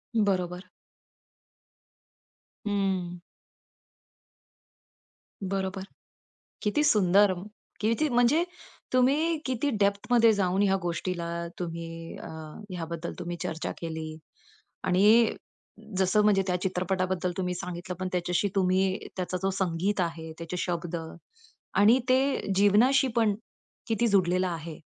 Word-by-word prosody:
बरोबर. 185 -4 0 2.0
हं. 190 -4 -1 2.3
बरोबर. 190 0 -2 0.8
किती 220 +8 +1
सुंदर! 200 -5 +5 0.5
किती 230 +8 +2
म्हणजे 245 +6 +4 0.5
तुम्ही 290 +6 +3
किती 260 +2 0
डेप्थमध्ये 220 +3 +4
जाऊन 190 -1 +1
ह्या 195 -1 +3
गोष्टीला 170 0 -2 0.3
तुम्ही 165 -1 -6
अ, - - -8 0.4
ह्या 180 -3 -4
बद्दल 170 0 -4
तुम्ही 175 -1 -4
चर्चा 160 - -3
केली 160 -1 -5 0.7
आणि 215 +5 +5 0.6
जसं 190 +2 +3
म्हणजे 205 -2 +4
त्या 180 - +1
चित्रपटाबद्दल 185 0 -1
तुम्ही 180 -1 -1
सांगितलं 180 0 -5
पण 185 - -2
त्याच्याशी 180 +2 0
तुम्ही 190 0 +1
त्याचा 185 0 -2
जो 195 - +2
संगीत 190 +1 0
आहे, 165 -2 -3
त्याचे 170 +1 -5
शब्द 175 -1 -2 0.8
आणि 220 +5 +6
ते 260 -5 +2
जीवनाशी 225 +8 +5
पण 220 -3 +3 0.5
किती 225 +1 +1
जुडलेलं 185 -3 +2
आहे 165 -2 -5
190 Hz, 105 wpm, -28 LUFS, 175-210 Hz, 2.3 s, आणि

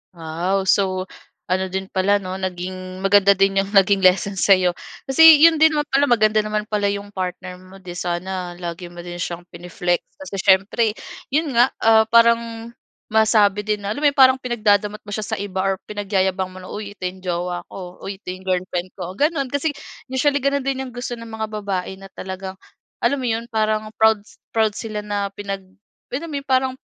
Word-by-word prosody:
Wow! 170 +4 -2
So, 190 -1 +2 0.5
ano 190 +1 +1
din 190 0 -3
pala, 190 +2 +2
'no? 185 -1 -6
Naging 185 0 -5
maganda 200 0 +5
din 195 0 +2
'yong 195 +1 -2
naging 195 0 +5
lesson 190 +2 +3
sa'yo. 185 -2 +4 0.4
Kasi 315 +3 +8
'yon 330 0 +8
din 320 0 +6
naman 295 0 0
pala 275 +1 +4
maganda 215 -3 +3
naman 215 0 -2
pala 205 -1 0
'yong 205 0 -6
partner 185 0 -4
mo, 185 +1 -15
'di 185 -2 -9
sana 175 +1 -4
lagi 175 0 -6
mo 175 - -12
din 175 0 -7
siyang 175 0 -4
pine-flex. 175 0 -2 0.2
Kasi 205 - -7
siyempre, 195 +4 +3 0.4
'yon 305 +1 +1
nga, 240 +3 +5
ah, 220 0 +6
parang 230 0 +3 0.4
masabi 215 -2 +3
din 210 0 -1
na, 205 +2 -2
alam - - -5
mo - - +6
'yong 280 - -7
parang 260 0 +8
pinagdadamot 210 -4 +1
mo 205 - -10
siya 215 +1 -3
sa - - -2
iba 190 -2 -3
or 195 -1 0
pinagyayabang 190 -2 -1
mo 185 - -11
na, 185 - -11
"Uy, 205 +1 -6
ito 205 - -13
'yong 185 +1 -9
jowa 175 0 -3
ko. 180 -1 -9
Uy, 195 0 -6
ito - - -39
'yong 185 +1 -9
girlfriend 180 -1 -1
ko." 180 +1 -5
Gano'n. 290 - +1
Kasi 285 +4 -1 0.4
usually 285 +2 +2
gano'n 280 0 +1
din 265 0 -2
'yong 260 - -8
gusto 245 0 -4
ng 230 -1 -10
mga 220 0 -3
babae 195 -3 -3
na 195 0 -13
talagang, 190 0 -7 0.4
alam 280 - +2
mo 260 - -5
'yon 230 0 -2
parang 215 -2 0
proud 220 -1 +4
s - - -20 0.2
proud 220 -2 +1
sila 215 -2 -5
na 205 -1 -3
pinag, 200 -1 -6 0.5
alam 290 +7 -4
mo 300 - -6
yun, 275 - -16
parang 260 0 +2
200 Hz, 200 wpm, -21 LUFS, 185-225 Hz, 0.5 s, Kasi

